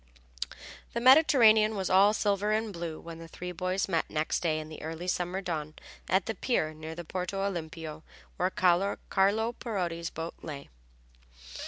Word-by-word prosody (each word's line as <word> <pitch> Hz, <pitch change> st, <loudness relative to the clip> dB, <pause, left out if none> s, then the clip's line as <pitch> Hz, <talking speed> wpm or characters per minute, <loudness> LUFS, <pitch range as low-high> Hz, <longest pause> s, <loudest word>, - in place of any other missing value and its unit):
The 235 Hz, -, 0 dB
Mediterranean 235 Hz, -5 st, +6 dB
was 190 Hz, -2 st, -1 dB
all 195 Hz, +2 st, +6 dB
silver 205 Hz, -1 st, +1 dB
and 215 Hz, -1 st, 0 dB
blue 170 Hz, -2 st, -5 dB
when 165 Hz, -1 st, -9 dB
the 165 Hz, -, -9 dB
three 180 Hz, +2 st, -7 dB
boys 185 Hz, +2 st, -1 dB
met 170 Hz, -4 st, 0 dB
next 155 Hz, 0 st, 0 dB
day 160 Hz, -3 st, +1 dB
in 155 Hz, -, -7 dB
the 155 Hz, -, -9 dB
early 165 Hz, +3 st, -5 dB
summer 180 Hz, +1 st, -1 dB
dawn 155 Hz, -4 st, -4 dB, 0.3 s
at 185 Hz, 0 st, +3 dB
the 225 Hz, -, -2 dB
pier 180 Hz, -7 st, 0 dB
near 155 Hz, +1 st, -8 dB
the 175 Hz, 0 st, -7 dB
Porto 185 Hz, +3 st, -3 dB
Olimpio 160 Hz, -4 st, -5 dB, 0.4 s
where 180 Hz, -, +1 dB
Carlo 185 Hz, +1 st, +2 dB, 0.6 s
Parodi's 175 Hz, -7 st, -2 dB
boat 165 Hz, +1 st, -5 dB
lay. 140 Hz, -3 st, -7 dB
180 Hz, 160 wpm, -29 LUFS, 160-200 Hz, 0.6 s, Mediterranean